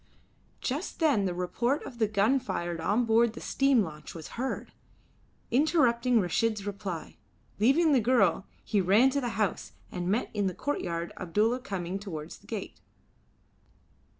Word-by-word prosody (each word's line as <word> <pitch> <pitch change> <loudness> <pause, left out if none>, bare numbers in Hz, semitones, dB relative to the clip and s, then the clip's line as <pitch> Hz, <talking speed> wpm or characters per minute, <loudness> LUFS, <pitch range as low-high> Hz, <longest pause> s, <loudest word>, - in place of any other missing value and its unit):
Just 290 +8 -3
then 280 - +3
the 180 - -1
report 235 - -1
of 240 - -9
the 220 - +3
gun 215 +6 +2
fired 175 -7 -3
on 215 +8 +2
board 225 0 +3
the - - -8
steam 270 -5 +2
launch 150 -3 -8
was 160 -2 -8
heard, 260 +3 -4 0.8
interrupting 250 -4 +3
Reshid's 210 +3 0
reply. 200 -4 -5 0.4
Leaving 290 +9 +4
the 265 -4 +4
girl 210 -6 +2 0.2
he 205 -3 +1
ran 210 +9 +5
to 280 +1 0
the 245 - -1
house, 210 -5 -1 0.2
and 180 -1 -3
met 220 +6 0
in 205 -2 0
the 185 - -3
courtyard 170 -12 -3
Abdulla 210 +7 +1
coming 195 -6 -4
towards 160 -7 -7
the - - -22
gate. - - -6
215 Hz, 150 wpm, -29 LUFS, 185-250 Hz, 0.8 s, ran